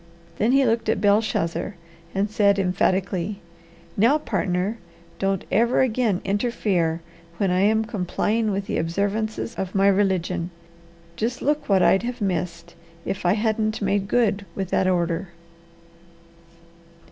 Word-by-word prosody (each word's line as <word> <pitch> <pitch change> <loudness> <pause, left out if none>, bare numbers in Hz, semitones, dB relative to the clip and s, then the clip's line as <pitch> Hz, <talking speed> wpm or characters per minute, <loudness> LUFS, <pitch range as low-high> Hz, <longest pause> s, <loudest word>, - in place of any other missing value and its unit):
Then 220 +4 +3
he 270 0 +4
looked 230 -1 +1
at - - +1
Belshazzar 205 -3 +1 0.4
and 195 +2 +1
said 200 -2 +3
emphatically: 190 +1 0 0.6
"Now, 235 +9 +4
partner, 195 -5 -1 0.4
don't 195 -1 0
ever 235 +5 +3
again 230 -6 +1
interfere 195 -6 0 0.4
when 195 -1 +1
I 180 - +2
am 220 +3 +3
complying 215 +2 -1
with 195 -1 -2
the - - -2
observances 205 +7 -2
of 190 0 -4
my 195 0 +4
religion. 185 -3 +1 0.7
Just 240 +3 -2
look 295 -1 0
what 190 -2 +4
I'd 195 - +4
have 245 +1 -4
missed 175 -3 -3 0.3
if 190 -2 -2
I 175 - +5
hadn't 215 0 0
made 200 -1 0
good 210 -3 +1
with 190 -2 -4
that 190 - +2
order!" 175 0 0
200 Hz, 135 wpm, -23 LUFS, 185-220 Hz, 0.7 s, I